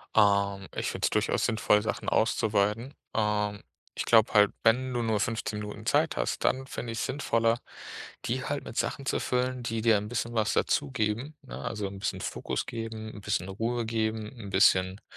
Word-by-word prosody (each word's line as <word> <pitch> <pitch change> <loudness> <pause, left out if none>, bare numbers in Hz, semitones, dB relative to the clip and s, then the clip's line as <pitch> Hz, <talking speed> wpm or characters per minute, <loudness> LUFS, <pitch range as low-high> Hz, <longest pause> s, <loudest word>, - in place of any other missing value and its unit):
Ähm, 100 -2 +3
ich - - -2
finde - - -1
es - - +3
durchaus - - +1
sinnvoll, 105 -2 +3
Sachen 110 - -2
auszuweiten. 110 +3 +1 0.2
Ähm, 105 -1 0 0.3
ich - - -2
glaube 110 -1 +5
halt, 105 -1 +6
wenn 125 +3 +3
du 120 - 0
nur 110 -2 +1
15 110 -1 -2
Minuten 105 0 -7
Zeit - - +2
hast, - - -1
dann 130 +1 +2
finde 115 -3 -5
ich 115 - -4
es - - 0
sinnvoller, 115 -4 +1 0.7
die 125 +2 -1
halt 145 0 -2
mit - - -9
Sachen 135 - -1
zu - - 0
füllen, 125 0 0
die 115 -1 -2
dir 115 -2 +5
'n 105 +1 -4
bisschen 120 0 -2
was 110 -1 +1
dazugeben, 130 +1 0
ne? 130 - -8
Also 110 -5 -3
'n 95 0 -8
bisschen - - -2
Fokus - - -3
geben, 115 -1 -5
'n 105 - -9
bisschen 90 0 -1
Ruhe 115 +4 -1
geben, 110 -1 -1
'n 100 -3 -7
bisschen, 95 0 +4
110 Hz, 190 wpm, -29 LUFS, 105-120 Hz, 0.7 s, halt